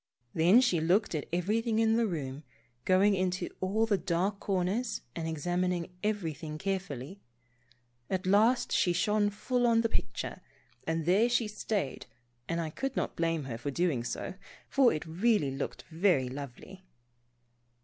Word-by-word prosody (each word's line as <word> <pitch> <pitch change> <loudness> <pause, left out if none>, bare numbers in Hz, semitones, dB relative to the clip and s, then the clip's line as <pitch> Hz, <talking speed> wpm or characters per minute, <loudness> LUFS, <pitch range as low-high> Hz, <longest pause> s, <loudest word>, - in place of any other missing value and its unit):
Then 180 +9 +6
she 185 -11 +2
looked 180 +6 +2
at 150 -3 -3
everything 215 +6 0
in 225 0 +3
the 230 -1 +2
room, 145 -5 -4 0.4
going 190 +2 +4
into 185 -1 -1
all 205 +4 +1
the 205 -4 +1
dark 185 +4 0
corners 200 +5 -1
and 165 -1 -3
examining 175 +2 -1
everything 165 -7 -2
carefully. 190 -2 -4 0.9
At 190 0 -1
last 215 +6 +3
she 175 - +3
shone 205 +4 +2
full 245 +4 0
on 230 -1 +4
the 230 - 0
picture, - - -3 0.5
and 160 -1 -1
there 200 +7 +4
she 240 -2 +2
stayed 210 -7 -3 0.4
and 165 0 0
I 160 -2 -3
could 270 - -3
not - - -2
blame 165 -2 0
her 120 -4 -5
for 145 - -3
doing 145 -5 0
so, - - -4 0.3
for 270 -3 +4
it 155 - -3
really 175 - +1
looked 135 +1 -5
very 160 -7 +2
lovely. 140 +8 -9
185 Hz, 150 wpm, -30 LUFS, 160-215 Hz, 0.9 s, Then